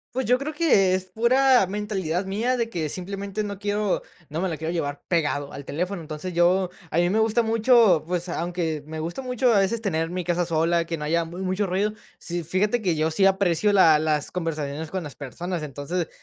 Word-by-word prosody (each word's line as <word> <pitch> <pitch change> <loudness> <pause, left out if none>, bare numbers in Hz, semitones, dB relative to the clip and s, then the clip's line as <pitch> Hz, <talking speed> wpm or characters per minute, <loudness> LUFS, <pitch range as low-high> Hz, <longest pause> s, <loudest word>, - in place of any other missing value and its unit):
Pues, 260 0 0
yo 250 +2 +4
creo 280 +3 -4
que 210 - +3
es 185 0 -1
pura 250 +3 +4
mentalidad 195 -3 -2
mía, 225 +7 0
de 230 -1 -1
que 165 -8 -3
simplemente 200 +4 -4
no 200 -1 -6
quiero 205 -1 0 0.3
no 155 +3 -3
me 190 - 0
la 160 - -3
quiero 160 +2 -3
llevar 145 -4 -3
pegado 150 -4 0
al 140 - -7
teléfono. 175 +6 -3
Entonces, 155 +3 -6
yo 180 +2 +3 0.2
a - - -2
mí 175 0 +3
me 210 +4 +2
gusta 225 +1 +2
mucho, 225 -5 +4
pues, 175 +1 -2
aunque 170 -3 -2
me 155 +1 -6
gusta 170 +10 -4
mucho 250 -1 +1
a 205 - +5
veces 205 +4 0
tener 165 -6 -1
mi 180 0 -4
casa 175 0 +1
sola, 165 +1 +1
que 165 0 -3
no 150 - -5
haya 170 +2 +1
mu 170 +2 -9
mucho 190 +2 -1
ruido, 195 +3 0 0.3
sí, 175 -1 -4
fíjate 205 +8 0
que 175 -5 0
yo 155 +1 +1
sí 175 +5 +2
aprecio 195 0 +3
la 165 -6 +6
las 155 -2 0
conversaciones 155 -3 -3
con 190 - -2
las 145 - -9
personas. 170 +5 -5
Entonces, 150 +4 -3
180 Hz, 215 wpm, -24 LUFS, 160-205 Hz, 0.3 s, la